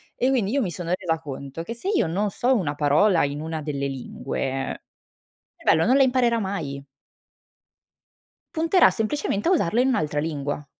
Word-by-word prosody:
e 255 - +1
quindi 235 -7 +1
io 275 +1 +1
mi 195 - -1
sono 170 +1 -5
resa 165 -3 -1
conto, 140 0 -7
che 230 - -5
se 235 +12 -5
io 415 - +2
non 200 +6 0
so 250 +6 +1
una 155 -9 -1
parola 155 +6 +3
in 145 +1 -2
una 160 0 -4
delle 140 -2 -2
lingue, 135 0 -4 0.7
cervello 160 +6 +2
non 255 +3 +4
la 275 - +6
imparerà 245 -3 +2
mai. 155 -9 -4 1.7
Punterà 330 +3 +4
semplicemente 225 - -1
a - - +3
usarlo 240 - +2
in 265 - +2
un'altra 150 - 0
lingua. 145 -2 -3
175 Hz, 165 wpm, -24 LUFS, 145-240 Hz, 1.7 s, la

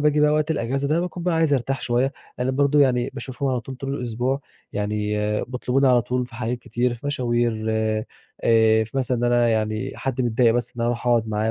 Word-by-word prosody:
باجي 150 0 +3
بقى 150 0 +5
وقت 155 +1 +1
الأجازة 135 -1 -1
ده 160 +3 +2
باكون 175 0 -4
بقى 175 -1 +1
عايز 160 -3 +2
ارتاح 135 +1 -1
شويّة، 125 +3 +1 0.3
لإن 125 +1 0
برضه 145 +1 +3
يعني 125 -3 +3
باشوفهم 135 0 -4
على 125 -2 0
طول 130 +2 -8
طول 135 +1 -4
الأسبوع، 125 +2 -2 0.3
يعني 105 +1 -2 0.5
بيطلبوني 130 +2 0
على 125 -2 +5
طول 125 +1 -1
في 120 - -16
حاجات 120 +1 -2
كتير، 120 0 -1
في 120 +5 -9
مشاوير، 120 -5 0
آآ 110 0 +1
في 110 - -13
مثلًا 130 -2 0
إن 120 - 0
أنا 120 -1 +3
يعني 110 +3 -1
حد 130 -1 -3
متضايق 120 0 +3
بس 120 - -1
إن - - -5
أنا 120 - +1
اروح 120 +1 -3
اقعُد 115 -2 +3
معاه 110 +1 0
125 Hz, 215 wpm, -23 LUFS, 115-135 Hz, 0.5 s, بقى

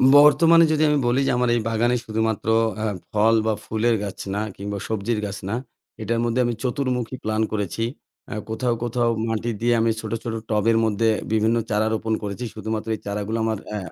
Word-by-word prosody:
বর্তমানে 165 +3 +7
যদি 155 0 +2
আমি 150 - +3
বলি 120 +2 +2
যে - - +3
আমার 125 0 +2
এই 120 - +1
বাগানে 120 +2 +2
শুধুমাত্র 110 -1 -1 0.4
আ - - +1 0.3
ফল 110 +2 +4
বা 110 - +2
ফুলের 115 +2 +1
গাছ 100 -2 -6 0.2
না, 105 - 0
কিংবা 100 +1 -5
সবজির 110 +1 -1
গাছ 100 0 -5
না, 110 - 0 0.5
এটার 115 0 -1
মধ্যে 120 +1 0
আমি 120 - 0
চতুর্মুখী 125 -1 -1
প্ল্যান 110 0 0
করেছি। 105 +1 -2 0.5
আ - - -3 0.2
কোথাও, 120 +2 0
কোথাও 120 0 +1 0.2
মাটি 115 +1 -1
দিয়ে 120 0 +3
আমি 115 0 +3
ছোটো, - - -3
ছোটো 115 -2 -3
টবের 110 +1 +2
মধ্যে 110 +1 +2 0.2
বিভিন্ন 110 +2 +3
চারা 105 +1 +1
রোপণ 110 0 -1
করেছি 100 +4 -4
শুধুমাত্র 110 0 -4
এই - - -11
চারাগুলো 105 +2 -2
আমার 110 -1 0 0.2
আ - - -1
115 Hz, 190 wpm, -23 LUFS, 110-120 Hz, 0.5 s, বর্তমানে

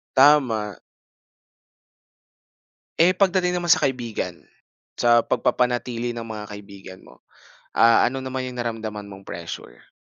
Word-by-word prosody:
Tama. 130 -8 +4 2.2
Eh, 170 +3 +6
pagdating 180 -1 +1
naman 175 - -4
sa 160 - +5
kaibigan, 125 -5 -2 0.6
sa 120 0 +4
pagpapanatili 120 0 0
ng 115 - -5
mga 110 -2 -7
kaibigan 100 -2 -12
mo. - - -18 0.5
Ah, 115 0 +5
ano 135 +1 -2
naman 130 0 -4
'yong 125 -1 -7
naramdaman 110 -3 -5
mong 95 0 -12
pressure? 85 -7 -9
120 Hz, 115 wpm, -23 LUFS, 105-130 Hz, 2.2 s, Eh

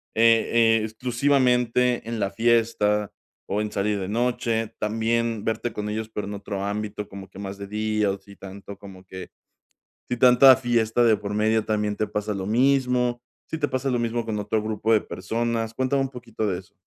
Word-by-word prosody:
eh, 115 0 +4
exclusivamente 125 0 +1
en 115 -1 -3
la 100 -1 -1
fiesta 115 -3 +1 0.4
o 105 +2 +1
en 105 - -3
salir 100 +1 -1
de 95 - -4
noche, 115 0 -1
también 115 +1 -1
verte 115 +1 -2
con 105 0 -4
ellos 110 +1 -4
pero 105 -2 -5
en 105 - -5
otro 100 -1 -5
ámbito, 105 0 -4
como 95 -1 -10
que 95 - -12
más 100 0 -6
de 100 0 -7
día, 105 -1 0
o 100 - -4
si 100 +1 -16
tanto 100 +1 -10
como 95 -2 -12
que 95 0 -9 0.8
si 125 - -1
tanta 125 +2 +7
fiesta 120 -2 +1
de 110 -2 +5
por 100 0 -5
medio 110 +1 +2
también 105 -1 -1
te 110 - -1
pasa 105 0 -3
lo 95 -1 -4
mismo, 125 0 +2 0.3
si 160 - -4
te 145 - 0
pasa 130 +1 -2
lo 125 - 0
mismo 115 0 -1
con 110 -2 -2
otro 105 +1 -1
grupo 110 +1 -1
de 110 - +5
personas. 115 +3 -3
Cuéntame 135 +1 +1
un 135 - -3
poquito 115 -4 -5
de 90 -2 -1
eso. 95 - -22
110 Hz, 190 wpm, -24 LUFS, 105-120 Hz, 0.8 s, tanta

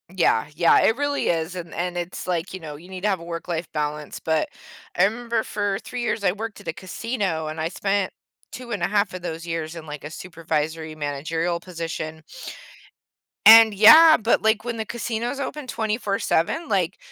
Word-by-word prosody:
Yeah, 165 -10 +2
yeah, 170 +1 +5
it 225 - +3
really 285 0 0
is, 165 +1 -1
and 170 -2 -7
and 175 +1 -3
it's, 175 0 -5
like, 175 0 -2
you 190 - -5
know, 155 -3 -8
you 175 +5 -15
need 185 -1 -7
to 210 - +1
have 190 -3 0
a - - -11
work-life 170 -1 -5
balance, 150 -1 -3
but 160 -1 0 0.5
I 180 - +5
remember 230 +1 -1
for 205 -2 -2
3 250 - -5
years, 235 -3 -1
I 180 - +3
worked 220 +3 -6
at - - -15
a 165 - -2
casino 190 -3 -3
and 155 +1 -5
I 160 - -1
spent 195 +1 -1 0.4
2.5 210 -4 -1
of 185 - -6
those 165 -1 -5
years 165 -1 -4
in, 160 -1 -8
like, 150 -1 -8
a 145 - -6
supervisory 160 -2 -4
managerial 160 +4 -2
position 165 -3 -6 1.2
and 225 0 +10
yeah, 310 +11 +9
but, 225 +2 +2
like, 220 0 +2
when 235 -1 -3
the 220 - -3
casino's 235 +3 -3
open 280 0 -5
24/7, 220 - -1
like, 190 - 0
180 Hz, 180 wpm, -23 LUFS, 160-220 Hz, 1.2 s, and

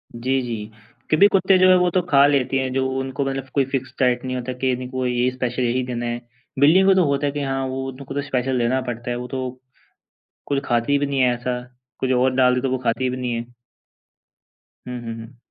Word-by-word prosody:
जी, 130 +3 0
जी। 110 -3 -5 0.4
कभी 175 +7 +7
कुत्ते 190 0 +4
जो 185 0 +5
हैं 185 - +7
वो 180 0 +3
तो 185 - +2
खा 140 -2 +6
लेते 135 -2 +1
हैं 130 -1 -2
जो 130 0 +1
उनको 135 +1 -3
मतलब 135 -1 -3
कोई 135 -2 +3
फ़िक्स्ड 130 -1 -3
डाइट 125 -1 +2
नहीं 130 0 -3
होता 125 0 -4
के 130 -1 +2
इनको 130 +1 -3
ये 125 0 +1
स्पेशल 125 0 -3
यही 125 +2 +1
देना 120 -1 -4
है। 120 0 -3 0.4
बिल्लियों 180 +7 +5
को 195 - +7
तो 185 - +4
होता 140 0 0
है 140 - +1
के 145 - -4
हाँ, 135 -1 -1
वो 130 0 -4
उनको 135 +1 -9
तो 145 - 0
स्पेशल 130 -2 -1
देना 125 +3 +1
पड़ता 120 0 -4
है, - - -1
वो 125 0 -6
तो 130 -1 -5 0.9
कुछ 140 -1 0
खाती 120 +4 +1
भी 145 - 0
नहीं 140 -1 -2
है 125 -1 +4
ऐसा। 125 +1 -3 0.4
कुछ 130 0 0
और 130 +1 +3
डाल 125 -1 +4
दे, 125 - 0
तो 135 - -1
वो 130 - +1
खाती 125 +1 -1
भी 130 - -3
नहीं 125 -1 -2
है। 115 0 -3 1.4
हुँ, 125 -1 -5
हुँ, 115 0 -5
हुँ। 115 +2 -11
130 Hz, 235 wpm, -22 LUFS, 125-135 Hz, 1.4 s, कभी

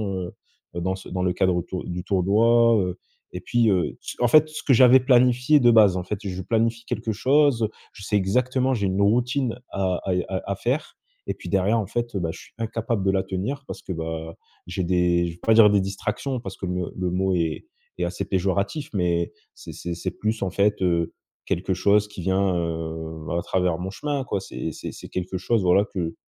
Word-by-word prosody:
heu 90 -1 -5 0.4
heu, 85 - -3
dans 95 +1 -1
ce 95 - -11
dans 90 0 -2
le 90 -1 +1
cadre 90 -1 +1
tour 90 0 -5
du 90 0 -5
tournoi, 115 +5 +4
heu 90 0 -3 0.4
et - - -5
puis 120 -2 +2
heu, 90 -3 0 0.2
en 120 - +4
fait, 155 +2 +6
ce 155 - -7
que 140 - +1
j'avais 125 +1 +7
planifié 125 +2 +4
de 120 -2 +5
base, 105 -5 +6
en 90 - -3
fait, 100 +2 -4
je 95 -1 -4
planifie 115 +3 0
quelque 110 - -3
chose, 130 -1 +3 0.2
je 105 - -13
sais 105 - -1
exactement, 125 +6 +1
j'ai 100 -5 0
une 95 +2 0
routine 125 +4 +1
à 95 -2 -1
à 95 - 0
y 90 - 0
à 95 -1 -2
à 100 - 0
faire 125 - -2 0.3
et - - -1
puis - - -10
derrière, 100 +4 +2
en 100 - -3
fait, 120 0 -3
heu, - - 0
bah, 85 -1 -2
je - - -10
suis - - -16
incapable 115 -2 -2
de - - +3
la 95 -1 +1
tenir 120 +10 -4
parce - - -7
que - - -7
bah, 80 0 -5 0.3
j'ai 90 +1 -2
des 90 -1 +2
je - - -4
vais 85 - -17
pas 115 - +3
dire 110 -2 +8
des 100 -1 +3
distractions, 105 +7 -3
parce 95 -4 -7
que 95 - -5
me 90 -1 -3
le 90 -1 -1
mot 95 +1 +1
est 85 - -2 0.3
est - - -2
assez - - -3
péjoratif, 100 - -1
mais 85 -3 0 0.2
c'est - - -10
c'est 85 -1 -5
c'est - - -4
plus, 110 +1 -2
en 95 - -2
fait 100 +2 +1
heu, 85 -2 +1 0.3
quelque 95 +2 -1
chose 100 +3 +3
qui 105 -3 -9
vient, 95 0 +1
heu, 80 -1 -4
à - - 0
travers 90 -3 0
mon 95 +1 -4
chemin 140 +4 -3
quoi. 100 - -2
C'est 80 -4 -5
c'est - - -7
c'est - - -10
quelque 90 +1 -3
chose 110 +1 +1
voilà 90 +3 +4
que 85 -4 -3
95 Hz, 225 wpm, -24 LUFS, 90-115 Hz, 0.4 s, dire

